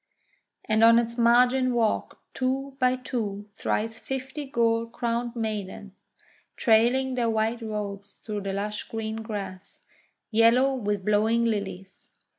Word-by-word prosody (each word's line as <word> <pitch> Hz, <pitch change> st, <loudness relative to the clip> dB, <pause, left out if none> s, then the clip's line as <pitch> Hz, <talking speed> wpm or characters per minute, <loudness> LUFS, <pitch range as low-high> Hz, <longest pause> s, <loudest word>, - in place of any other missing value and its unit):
And 220 Hz, 0 st, +2 dB
on 230 Hz, 0 st, +8 dB
its 235 Hz, 0 st, 0 dB
margin 245 Hz, +2 st, +4 dB
walked 225 Hz, -2 st, 0 dB, 0.2 s
two 265 Hz, +1 st, -2 dB
by 255 Hz, 0 st, +3 dB
two 225 Hz, -6 st, -4 dB
thrice 225 Hz, +1 st, -2 dB
fifty 265 Hz, +2 st, -5 dB
gold 230 Hz, -3 st, +1 dB
crowned 235 Hz, 0 st, -2 dB
maidens, 205 Hz, -3 st, -5 dB, 0.5 s
trailing 245 Hz, +3 st, +3 dB
their 240 Hz, -2 st, 0 dB
white 225 Hz, +1 st, 0 dB
robes 205 Hz, -2 st, -5 dB
through 210 Hz, -2 st, -5 dB
the 195 Hz, 0 st, -3 dB
lush 210 Hz, +1 st, -3 dB
green 220 Hz, -1 st, -4 dB
grass, 200 Hz, -4 st, -7 dB, 0.5 s
yellow 230 Hz, +5 st, +4 dB
with 205 Hz, -6 st, -2 dB
blowing 220 Hz, +3 st, +2 dB
Lilies. 195 Hz, -4 st, -4 dB
225 Hz, 125 wpm, -26 LUFS, 210-245 Hz, 0.5 s, on